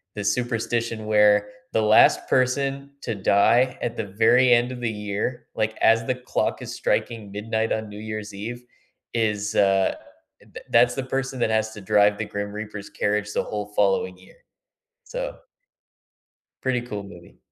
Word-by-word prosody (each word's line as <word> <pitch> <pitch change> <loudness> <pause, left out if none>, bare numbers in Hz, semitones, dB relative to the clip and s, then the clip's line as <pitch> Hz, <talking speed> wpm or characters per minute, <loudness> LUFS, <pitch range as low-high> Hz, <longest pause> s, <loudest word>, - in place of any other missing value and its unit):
this 100 -1 +1
superstition 115 -2 -2
where 105 -1 +4 0.2
the 110 - +2
last 110 0 +5
person 135 +2 +1
to 115 - -3
die 115 +6 +3
at 120 - -3
the 110 - -2
very 125 +6 +4
end 120 +1 +3
of 125 - -6
the 120 -2 -1
year, 105 +3 -4
like, 110 0 -1
as 115 0 +4
the 130 - 0
clock 125 0 -2
is - - -6
striking 110 -3 -1
midnight 110 +2 -2
on 110 -1 -3
New 105 0 -9
Year's 110 -1 -6
Eve, 115 +5 -6 0.5
is, 105 -3 -1
uh 95 -1 +3 0.6
th - - -9
that's 125 +1 +4
the 135 - -2
person 135 0 -3
that 120 - +1
has 110 0 +1
to 105 - -9
drive 105 +1 +3
the 110 - -3
Grim 100 0 -3
Reaper's 105 -1 -7
carriage 105 0 -1
the - - 0
whole 105 -1 -4
following 95 -2 +1
year, 95 0 -19 0.7
so - - -5 1.2
pretty 130 -2 0
cool 105 -4 -6
movie. 90 -3 -14
110 Hz, 165 wpm, -24 LUFS, 105-120 Hz, 1.2 s, last